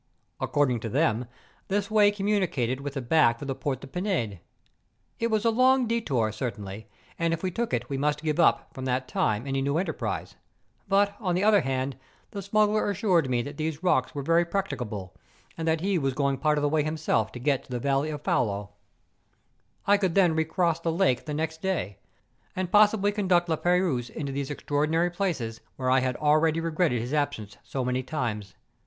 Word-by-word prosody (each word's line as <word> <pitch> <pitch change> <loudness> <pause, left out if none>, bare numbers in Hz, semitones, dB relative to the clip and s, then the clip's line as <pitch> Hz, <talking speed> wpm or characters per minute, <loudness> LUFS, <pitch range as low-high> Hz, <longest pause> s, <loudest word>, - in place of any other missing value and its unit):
According 135 -5 +1
to 115 - -5
them, 125 -3 +1 0.4
this 200 +1 -1
way 210 -1 +6
communicated 190 - 0
with 140 0 -5
the 135 - -3
back 120 -4 +3
of 140 - -6
the 135 - -1
Port 135 -1 -3
de - - -8
PinMe. 135 - -2 0.8
It 230 - 0
was 220 0 0
a 230 - +4
long 255 +2 +4
detour, 140 - 0
certainly, 105 -2 -5 0.3
and 165 0 +1
if 165 - -13
we 185 - 0
took 235 +5 -2
it - - -1
we 135 -1 -3
must 150 +1 0
give 155 0 -1
up, 170 - +3
from 130 - -6
that 130 0 -1
time, 110 -1 0
any 135 -1 -1
new 140 +3 0
enterprise; 185 - -3
♦ - - -30 0.5
but, 200 +1 +2
on 185 -6 -1
the 185 - +1
other 210 -1 +5
hand, 130 0 -2 0.3
the 200 - -5
smuggler 210 +1 +2
assured 185 -8 +2
me 120 -2 +1
that 145 +2 -8
these 160 +1 -3
rocks 130 -9 +1
were 140 - -3
very 165 +4 +3
practicable, 120 - -4 0.4
and 165 0 -4
that 160 0 +1
he 190 -1 +1
was 135 -3 -1
going 140 -2 0
part 150 +1 +2
of 145 - 0
the - - +3
way 155 0 +2
himself 155 -8 0
to - - -6
get 140 +1 +1
to - - -26
the 125 - -1
valley 140 +4 0
of 150 -1 -6
Faulo. 100 -2 0 1.1
I 205 +1 +5
could 190 -4 0
then 180 -4 +5
recross 160 +1 +1
the 165 0 -1
lake 160 -8 +1
the 150 - -4
next 160 +1 -3
day, 160 - -2 0.6
and 185 -1 -2
possibly 210 -1 +5
conduct 185 -4 +1
La 160 - +2
Peyrouse 175 -8 +1
into 140 -3 -5
these 140 0 -3
extraordinary 155 +4 0
places 160 - -2
where 130 -1 -1
I 130 - +5
had 130 0 -1
already 155 +2 +3
regretted 165 -5 +1
his 120 +5 -5
absence 110 -9 -2
so 130 -2 -4
many 125 +1 0
times. 115 -8 -4
150 Hz, 200 wpm, -27 LUFS, 130-185 Hz, 1.1 s, way